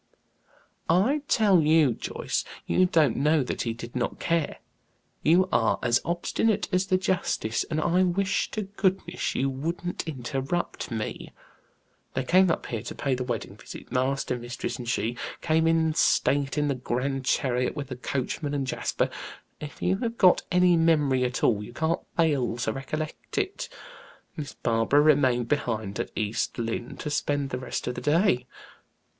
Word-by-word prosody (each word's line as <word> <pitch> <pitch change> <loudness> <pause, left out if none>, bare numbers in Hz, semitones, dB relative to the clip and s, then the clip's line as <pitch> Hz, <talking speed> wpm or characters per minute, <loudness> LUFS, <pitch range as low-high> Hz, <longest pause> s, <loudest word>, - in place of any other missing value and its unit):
"I 215 - +3
tell 200 -7 +4
you, 155 -4 +4
Joyce, - - -3 0.2
you 185 - +3
don't 155 -8 +3
know 150 +1 +3
that - - -3
he 115 - -1
did 115 +2 -9
not 120 -1 -2
care. 165 -3 0 0.6
You 180 +4 +4
are 115 -2 +3
as 120 0 +3
obstinate 195 +5 0
as 185 +1 +2
the 185 - +3
justice, 180 - -1
and 155 -1 -2
I 175 +3 +2
wish 185 +2 +1
to 215 - -3
goodness 190 -3 -1
you 135 - +1
wouldn't 165 +7 -3
interrupt 135 +3 -3
me. 110 -2 -4 0.8
They 130 - 0
came 185 +7 +4
up 165 - -1
here 115 -3 -3
to - - -7
pay 140 - -1
the 125 0 -1
wedding 120 -3 -4
visit - - -11
master, 130 0 0
mistress, 120 +1 -5
and 120 -1 -5
she, 120 0 -1 0.2
came 160 0 +2
in 160 -1 +3
state 140 -2 +2
in 150 0 +2
the 140 - +1
grand 130 +1 -2
chariot, 125 -1 +1
with 145 -3 -5
the 125 - -4
coachman 140 +3 -3
and 140 -1 -1
Jasper. 130 - -1 0.5
If 150 -1 -8
you 185 +2 +2
have 230 +1 -3
got 185 -2 +6
any 180 -1 +5
memory 150 -6 +3
at 125 0 -3
all, 105 -3 +3
you 110 - -10
can't 160 +5 0 0.2
fail 145 -8 +2
to 115 -2 -1
recollect 155 +3 -5
it. - - -2 0.7
Miss 150 -3 -6
Barbara 115 +5 +2
remained 130 -6 +3
behind 110 -8 -1
at - - -2
East 110 +1 -1
Lynne 115 +1 -3
to 150 - -4
spend 145 -1 -1
the 125 - -2
rest 125 - -4
of 125 - -2
the - - -6
day." 150 -3 +2
145 Hz, 165 wpm, -27 LUFS, 125-170 Hz, 0.8 s, got